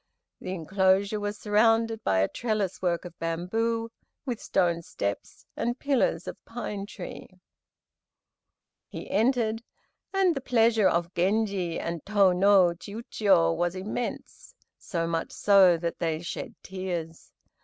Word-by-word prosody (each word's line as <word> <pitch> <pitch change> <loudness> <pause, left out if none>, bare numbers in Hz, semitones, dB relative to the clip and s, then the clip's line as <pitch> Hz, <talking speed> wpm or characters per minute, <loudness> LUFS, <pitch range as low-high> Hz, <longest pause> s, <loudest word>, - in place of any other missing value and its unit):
The 185 +1 -5
enclosure 190 +4 +1
was 205 0 -3
surrounded 225 +1 +2
by 95 -1 +2
"a 95 - +3
trellis 215 -5 -2
work 175 -1 0
of 175 - -8
bamboo," 225 +8 -1 0.3
with 245 -5 -3
"stone 170 -3 +1
steps," 100 -10 -5
and 240 +2 -2
"pillars 255 - 0
of - - -8
pine 210 -4 -5
tree." - - -8 1.6
He - - -8
entered, 225 0 +1 0.5
and 385 -3 +3
the 275 - -4
pleasure 225 -5 +3
of 170 +1 -1
Genji 190 -2 0
and 170 -2 -4
Tô 200 -3 +3
no 195 -1 +5
Chiûjiô 200 - +1
was 175 +1 -1
immense, 215 - -5 0.2
so 170 -4 -3
much 165 0 -2
so 195 -4 +5
that 170 0 -4
they 160 -2 -1
shed 170 - -6
tears. 175 -4 -5
195 Hz, 130 wpm, -27 LUFS, 170-225 Hz, 1.6 s, no